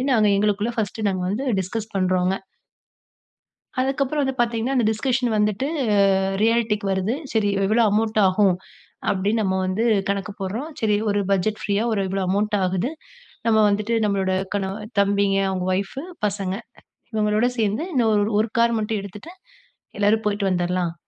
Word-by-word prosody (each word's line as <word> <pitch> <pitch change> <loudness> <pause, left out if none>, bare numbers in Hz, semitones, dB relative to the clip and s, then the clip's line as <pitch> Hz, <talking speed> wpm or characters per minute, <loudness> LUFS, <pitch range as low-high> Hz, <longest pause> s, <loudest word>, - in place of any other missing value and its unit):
அப்டின்னு 265 +1 +1
நாங்க 210 -1 +4
எங்களுக்குள்ள 210 +2 +1
பர்ஸ்ட் 215 +1 -2
நாங்க 185 -1 -2
வந்து 235 +7 -2 0.2
டிஸ்கஸ் 215 +4 -4
பண்றோங்க. 185 0 +1 1.5
அதுக்கப்புறம் 275 +2 0
வந்து 265 -1 -1
பார்த்தீங்கன்னா, 235 +3 0
அந்த 235 - +2
டிஸ்கஷன் 245 +2 0
வந்துட்டு 210 +5 +1 0.8
ரியாலிட்டிக்கு 225 -2 +1
வருது. 190 +4 0 0.2
சரி, 210 -2 +2 0.2
எவ்வளவு 225 +3 +3
அமௌண்ட் 220 +1 +1
ஆகும் 185 -1 +3 0.6
அப்படின்னு 205 +4 0
நம்ம 190 -1 0
வந்து 210 +5 0 0.2
கணக்கு 200 +1 -2
போடுறோம். 225 +11 -3
சரி, 210 -2 +2
ஒரு 205 - +1
பட்ஜெட் 205 +3 +1
ஃப்ரீயா, 205 +1 0
ஒரு 200 - 0
இவ்ளோ 195 0 -1
அமௌண்ட் 210 +2 +1
ஆகுது. 185 +7 0 0.6
நம்ம 220 - +4
வந்துட்டு 210 +3 0
நம்மளோட 195 -2 0 0.2
கணவன் 200 +3 -4
தம்பிங்க, 200 0 +2
அவங்க 185 -1 -2
ஒயிபு 200 - -3 0.2
பசங்க, 195 -2 -2 0.6
இவங்களோடு 215 +2 +2
சேர்ந்து 215 - 0
இன்னும் 220 -4 +2
ஒரு 220 0 +1
கார் 235 -1 +3
மட்டும் 215 -1 -1
எடுத்துட்டு, 210 - -10 0.7
எல்லாரும் 215 +2 +3
போய்ட்டு 200 -1 0
வந்தறலாம் 175 -1 0
210 Hz, 145 wpm, -22 LUFS, 195-225 Hz, 1.5 s, நாங்க